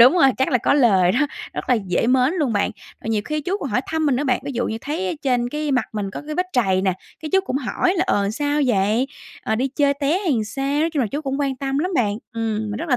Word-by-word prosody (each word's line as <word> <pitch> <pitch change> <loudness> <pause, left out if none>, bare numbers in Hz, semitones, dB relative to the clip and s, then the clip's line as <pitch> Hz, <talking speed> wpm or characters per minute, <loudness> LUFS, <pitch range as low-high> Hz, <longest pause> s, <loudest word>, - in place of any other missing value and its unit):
đúng 250 +6 +9
rồi, 275 -7 +6
chắc 265 - +2
là 250 - +3
có 240 - +2
lời 195 -10 +4
đó, 255 - +1 0.3
rất - - -5
là - - +6
dễ 195 -1 0
mến 260 +6 +3
luôn 280 -7 +1
bạn. 205 -1 +1 0.3
Ờ, - - -7
nhiều 215 -2 +1
khi 305 +4 -2
chú 360 +7 -1
còn - - -3
hỏi - - +2
thăm 320 -1 0
mình 270 - +3
nữa 285 - -1
bạn, 255 -3 +1
ví 280 - -4
dụ 240 -1 -1
như 225 - -3
thấy 325 +9 -2
ở 350 - -1
trên 245 -3 +1
cái 300 +1 -2
mặt 250 -4 +2
mình 205 -2 -3
có - - -7
cái 305 - -4
vết 360 +2 0
trầy 190 -6 +2
nè, 190 -1 +2 0.3
cái 310 -1 -6
chú 385 - +5
cũng 270 - -2
hỏi 290 +7 0
là 350 - +2
"Ờ, 200 0 +1
sao 290 +5 0
vậy? 220 +3 +2 0.4
Ờ, 220 - 0
đi 255 +5 0
chơi 280 +1 +2
té 285 +5 +1
hay 370 -7 0
làm 225 -4 0
sao?" 275 +6 -1
nói 330 +1 +1
chung 290 - +2
là, 240 - +2
chú 290 - -2
cũng 275 0 -2
quan 270 -2 0
tâm 275 +1 -2
lắm 360 +5 0
bạn. 215 -6 +1
Ừm, 225 -2 -1
mình 205 - -3
rất 335 - -4
là 250 - +3
265 Hz, 300 wpm, -22 LUFS, 225-295 Hz, 0.4 s, đúng